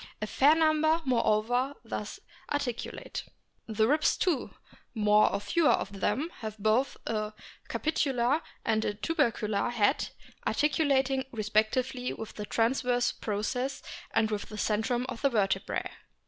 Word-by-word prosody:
A 215 - -2
fair 280 +8 +4
number, 315 0 +3
moreover, 245 +2 +1
thus - - -5 0.3
articulate. 265 -5 -3 0.4
The 220 0 +2
ribs 300 +4 +3
too, 345 -8 0 0.5
more 210 -1 +4
or - - -1
fewer 295 +11 +2
of 195 0 -3
them, 305 - 0
have 215 -2 -6
both 220 +6 +1
a 215 -1 -2 0.4
capitular 275 -2 +1 0.2
and 220 -1 +2
a 205 - -1
tubercular 225 - 0
head, 240 +3 +1 0.4
articulating 275 -3 +2
respect 215 -1 +1
ively 255 -1 -2
with 220 - -7
the 210 -1 -6
transverse 245 +2 +1
processes 250 +6 -3 0.3
and 220 -1 +1
with 210 -1 -3
the 215 - -7
centrum 225 +4 0
of 250 -3 -6
the 275 - +4
vertebrae. 195 -4 0
240 Hz, 135 wpm, -29 LUFS, 215-275 Hz, 0.5 s, fair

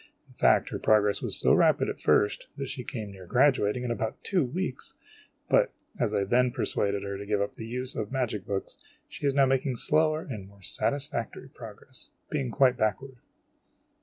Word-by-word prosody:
In - - -20
fact - - +3
her - - -4
progress 105 -1 +3
was - - +1
so - - +4
rapid - - +4
at - - -5
first, 105 - +2
that 135 -2 -4
she 125 - -5
came 110 -5 -6
near 95 -2 -12
graduating 125 -1 +3
in 120 - -2
about 110 -1 -3
two 185 -5 +2
weeks; 140 +2 -4 0.5
but, - - +3 0.2
as - - +1
I 100 - +2
then 125 +5 +3
persuaded 100 -4 -1
her 100 -1 -4
to 100 - -6
give 105 -1 +1
up 100 0 -1
the 110 - -8
use 125 +2 -2
of 110 - -2
the - - -20
magic 115 -7 -2
books, 100 -1 -4 0.2
she 145 - -4
is 135 - +1
now 140 -1 +5
making 130 0 +1
slower 155 +5 +1
and 105 -8 -6
more 100 -1 -19
satisfactory 135 - -3
progress, 120 +2 -11 0.2
being 140 -4 -1
quite 130 0 +3
backward. 115 +5 -1
120 Hz, 190 wpm, -28 LUFS, 105-135 Hz, 0.5 s, now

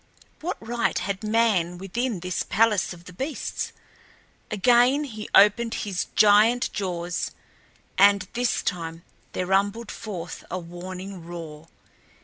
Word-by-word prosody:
What 340 - -3
right 235 -3 -1
had 190 +3 -3
man 210 -6 +2
within 200 +2 -2
this 180 0 -2
palace 220 -2 +2
of 175 -1 -10
the 180 - -11
beasts? 270 - -4 0.8
Again 245 +7 +4
he 220 -7 -7
opened 225 +3 +5
his 190 -3 -2
giant 215 +3 +5
jaws, 175 -3 -2 0.7
and 200 -1 +5
this 245 0 0
time 165 -2 -3 0.3
there 180 - -1
rumbled 200 +4 0
forth 180 -6 -7
a 185 - -3
warning 180 +1 -7
roar. 165 -2 -8
200 Hz, 125 wpm, -25 LUFS, 175-225 Hz, 0.8 s, opened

